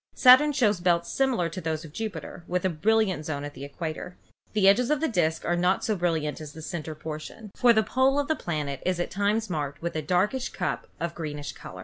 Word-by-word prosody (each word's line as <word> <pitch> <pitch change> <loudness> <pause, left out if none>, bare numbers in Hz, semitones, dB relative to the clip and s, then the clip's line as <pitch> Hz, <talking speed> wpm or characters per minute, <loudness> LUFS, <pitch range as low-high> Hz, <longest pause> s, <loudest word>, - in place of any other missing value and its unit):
Saturn 260 +4 +7
shows 220 -9 +2
belts 170 -1 +1
similar 260 -10 +1
to 165 +3 -6
those 160 0 -3
of 150 - -12
Jupiter, 215 -4 -6
with 180 +1 -1
a - - +3
brilliant 190 0 +1
zone 145 -2 -4
at 145 0 -6
the 135 - -9
equator. 160 +4 -6 0.4
The 205 -2 +4
edges 235 +5 +5
of 300 -2 +2
the 320 - +1
disk 165 - 0
are 175 - +1
not 180 +2 +1
so 215 - +1
brilliant 160 -5 -1
as 150 -1 -8
the 160 - -10
central 160 -2 -5
portion, 155 +7 -8
for 245 - +5
the 220 -1 +4
pole 260 +4 +2
of 285 -1 +1
the 315 - +1
planet 150 - -3
is 180 -1 0
at 175 - -2
times 205 +3 0
marked 145 -5 -3
with 170 - -3
a 155 - 0
darkish 185 - 0
cup - - -3
of 170 0 -2
greenish 150 -3 -5
color. - - -11
175 Hz, 230 wpm, -27 LUFS, 155-220 Hz, 0.4 s, Saturn